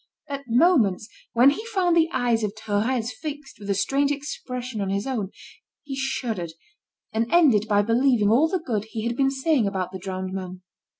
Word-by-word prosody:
At 280 -1 -5
moments, 235 - +3 0.3
when 250 +4 +6
he 430 - -4
found 370 -6 +1
the 325 -1 +4
eyes 240 -7 +1
of 210 0 -2
Thérèse 220 +3 -1
fixed 295 -6 -7
with 205 -1 -8
a 200 - +2
strange 275 +8 +1
expression 250 -5 -5
on 195 - -2
his 200 +1 -1
own, 235 -8 -2 0.5
he 275 -2 -6
shuddered, 230 -10 -3 0.6
and 230 +1 -1
ended 260 - +5
by 205 -1 +3
believing 230 -1 +3
all 275 +8 +5
the 375 +3 0
good 225 - -3
he 220 0 -5
had 235 0 -1
been 270 +1 +2
saying 270 -3 +1
about 190 -2 -2
the 190 - -7
drowned 185 0 -5
man. 185 -1 -6
235 Hz, 185 wpm, -24 LUFS, 205-275 Hz, 0.6 s, when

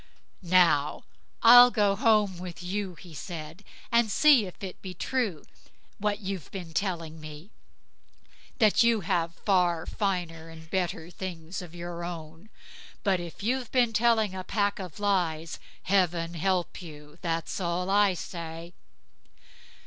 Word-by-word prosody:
"Now 170 -5 +3 0.4
I'll 245 +1 +10
go 205 -4 +2
home 210 -4 +2
with 180 -1 -8
you", 190 0 -3
he 175 -1 -13
said, 160 +3 -8 0.3
"and 235 -1 +3
see 260 -2 +5
if 180 - -12
it 190 - -7
be 185 -1 -7
true 215 - -2 0.6
what 205 0 0
you've 190 -6 -5
been 175 -4 -8
telling 165 -4 -3
me, 155 +6 -10 1.1
that 215 -4 +4
you 230 -2 +4
have 165 -1 -1
far 175 -4 +2
finer 175 -5 -3
and 160 0 -12
better 175 -3 -2
things 175 -1 -6
of 175 -1 -11
your 175 0 -6
own. 165 +2 -8 0.5
But 195 -3 +2
if 175 +2 -8
you've 250 +2 -1
been 245 -3 +2
telling 220 -3 +3
a 185 0 -5
pack 205 +1 0
of 180 -3 -8
lies, 170 -6 0 0.2
Heaven 175 -3 +1
help 180 +2 -1
you, 150 -1 -12
that's 165 +1 -2
all 180 +1 -1
I 200 -2 +4
say." 170 0 -7
180 Hz, 140 wpm, -28 LUFS, 165-205 Hz, 1.1 s, I'll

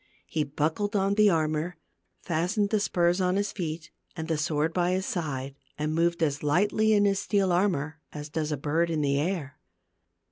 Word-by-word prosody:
He 155 - -1
buckled 155 +9 -1
on 195 0 +2
the 210 0 +5
armor, 160 0 0 0.5
fastened 185 +5 0
the 215 - +3
spurs 175 -1 +1
on 180 0 +2
his 205 +1 0
feet, 160 -3 -5 0.2
and 160 -2 -5
the 165 - 0
sword 155 +2 0
by 180 0 +1
his 190 +1 -1
side, 140 -8 -3 0.2
and 150 +1 -1
moved 170 +1 +1
as 145 -2 0
lightly 205 +8 +2
in 205 -1 +4
his 195 -1 +2
steel 200 -3 +1
armor 165 -5 0
as 150 -1 -7
does 155 0 -3
a 150 - -1
bird 160 +4 0
in 160 -2 0
the 140 -1 +1
air. 150 -4 -3
165 Hz, 185 wpm, -27 LUFS, 150-190 Hz, 0.5 s, the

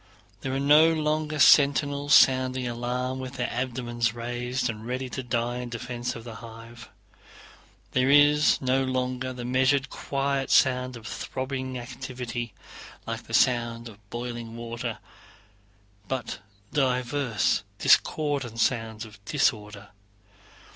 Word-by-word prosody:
There 130 - -4
are - - 0
no 150 +3 +6
longer 155 0 -1
sentinels 145 0 +5
sounding 130 -1 +4
the 120 - -2
alarm 125 +2 -3
with 130 0 -6
their 120 -2 -2
abdomens 120 -2 -2
raised, 120 +2 -2
and 110 -2 -5
ready 125 +2 -4
to 130 - -4
die 120 0 -2
in 125 -1 -5
defense 120 +1 -4
of 115 - -8
the 115 -2 -9
hive. 115 0 -11 1.0
There 130 +1 +2
is 145 +1 +5
no 130 0 +1
longer 130 0 -2
the 125 -1 -7
measured 130 +2 +2
quiet 140 -1 -2
sound 125 -1 +3
of 115 - -13
throbbing 130 +1 -4
activity, 120 -2 -6 0.5
like - - -5
the - - -1
sound 120 -1 +2
of 105 -2 -15
boiling 120 -1 -6
water, 115 0 -5 1.1
but 130 -3 -4 0.3
diverse 125 -3 +1 0.2
discordant 140 -7 +2
sounds 115 -2 0
of 105 -2 -15
disorder. 105 -5 -1
125 Hz, 125 wpm, -26 LUFS, 120-135 Hz, 1.1 s, no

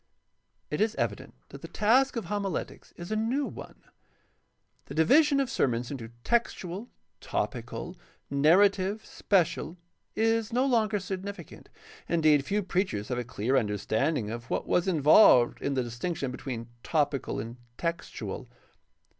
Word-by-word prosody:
— - - -47
It 150 - -1
is 220 +1 +1
evident - - -3
that - - -11
the - - -7
task 255 +6 +3
of 230 -5 -3
homiletics 200 0 -4
is 175 +3 -8
a - - +1
new 240 +6 0
one. - - -10 1.0
The - - -9
division 280 - +5
of 275 - +1
sermons 120 - -1
into 120 -5 -6
textual, 220 -3 -1 0.3
topical, - - -4 0.3
narrative, 190 +8 +3
special, 175 -2 0 0.4
is 225 0 +1
no 250 +3 +2
longer 225 -5 +2
significant. 195 +2 -7 0.4
Indeed, 155 -4 +4
few 205 +5 0
preachers 180 - -1
have 125 -1 -1
a - - -2
clear 120 +1 -1
understanding 110 +2 0
of 115 +1 -7
what - - -1
was 180 - +1
involved 150 - +6
in 140 - -1
the 130 - +1
distinction 130 +4 -3
between 120 -3 -6
topical 145 -3 -1
and 115 +3 -6 0.2
textual. 170 0 -4
170 Hz, 140 wpm, -28 LUFS, 130-215 Hz, 1.0 s, involved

